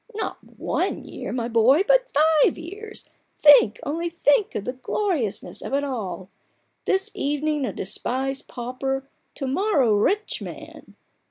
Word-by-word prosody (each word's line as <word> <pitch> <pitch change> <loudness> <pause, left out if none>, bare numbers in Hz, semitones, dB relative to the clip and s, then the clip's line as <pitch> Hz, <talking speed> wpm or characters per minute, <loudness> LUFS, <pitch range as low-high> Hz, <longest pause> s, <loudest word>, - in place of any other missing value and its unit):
" - - -20
Not 440 - -3
one - - -3
year, - - -6
my 240 -2 -2
boy, 240 - +4
but - - +4
five 310 0 +4
years! 405 +6 -9 0.3
Think, 285 -7 +7
only 335 +4 -2
think, 335 +3 +2
of 200 - -3
the 250 - -2
gloriousness 260 - -2
of 270 - -3
it 285 - 0
all! 215 -9 -4 0.6
This 385 +2 0
evening 295 -1 -1
a - - -2
despised 265 +7 -3
pauper, 265 +2 -4 0.3
to 275 - -4
morrow 280 - +2
a 205 - +2
rich 420 - 0
man - - -10
280 Hz, 150 wpm, -24 LUFS, 250-345 Hz, 0.6 s, Think